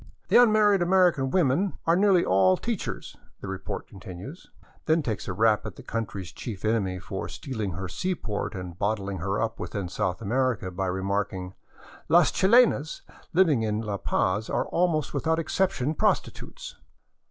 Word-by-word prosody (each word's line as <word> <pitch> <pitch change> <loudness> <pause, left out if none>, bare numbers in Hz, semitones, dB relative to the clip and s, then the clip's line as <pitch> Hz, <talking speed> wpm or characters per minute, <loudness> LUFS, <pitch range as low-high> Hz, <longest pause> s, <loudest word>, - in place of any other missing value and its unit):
" - - -41
The - - +7
unmarried 210 -4 +4
American 175 -6 +3
women 175 +4 +1
are 165 - +4
nearly 190 -2 +4
all 95 0 +4
teach 230 -4 -3
ers," - - -6 0.2
the - - -8
report 95 0 -5
continues, 95 - -10 0.4
then 160 0 +3
takes 110 -6 -3
a - - -2
rap 110 +2 +3
at 105 -4 -7
the - - -12
country's 105 -6 -4
chief 105 -1 -7
enemy 100 -4 0
for 95 +1 -6
stealing 110 - -4
her 95 +2 -5
seaport 115 - -3
and 90 -1 -7
bottling 100 -2 -1
her 100 +4 -1
up 115 0 -2
within 100 -4 -4
South 95 -1 -2
America 115 -3 -1
by 95 +1 -2
remarking, 95 0 -2 0.3
*' - - -21
Las 170 +1 +5
chilenas 195 - +3 0.3
living 165 -8 +3
in 105 -1 -1
La 105 -3 -3
Paz 100 +3 0
are - - 0
almost 165 -4 0
without 160 +3 0
excep 185 +3 +1
tion 150 -6 -2
prostitutes." - - -2
110 Hz, 165 wpm, -26 LUFS, -, 0.4 s, The